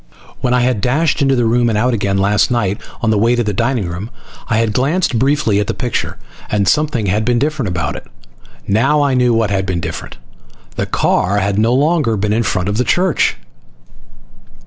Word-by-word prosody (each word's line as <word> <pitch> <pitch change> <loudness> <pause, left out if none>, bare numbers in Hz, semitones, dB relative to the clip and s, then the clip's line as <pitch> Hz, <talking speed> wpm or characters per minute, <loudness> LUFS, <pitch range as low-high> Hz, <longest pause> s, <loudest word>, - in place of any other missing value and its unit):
When 125 - -1
I 125 0 +3
had 125 -4 0
dashed 145 +6 +1
into 135 -1 +3
the 120 -2 +1
room 120 +1 +2
and 110 - 0
out 125 +3 +1
again 100 -3 0
last 100 +1 +2
night 105 -5 -1 0.2
on 110 -3 +1
the 105 - +2
way 115 +3 +3
to 120 - 0
the 105 -1 -2
dining 115 -1 -1
room 90 +6 -6 0.4
I 115 - 0
had 115 -2 +1
glanced 135 0 0
briefly 135 -6 +1
at 105 - -1
the - - -2
picture - - -3 0.3
and 100 -2 0
something 150 -3 +1
had 105 +3 0
been 120 +1 +1
different 145 -2 -1
about 80 -5 -2
it. - - -9 0.6
Now 135 +9 +2
I 140 -2 +1
knew 125 -1 +3
what 115 -3 +1
had 95 -1 -1
been 90 -2 -1
different. - - -6 0.6
The - - -2
car 100 +3 +1
had 100 0 0
no 115 +3 +2
longer 145 -5 +1
been 105 +1 0
in 115 - +1
front 100 -5 -1
of 100 +1 -1
the 125 - +2
church. 180 +5 +1
115 Hz, 210 wpm, -16 LUFS, 100-130 Hz, 0.6 s, I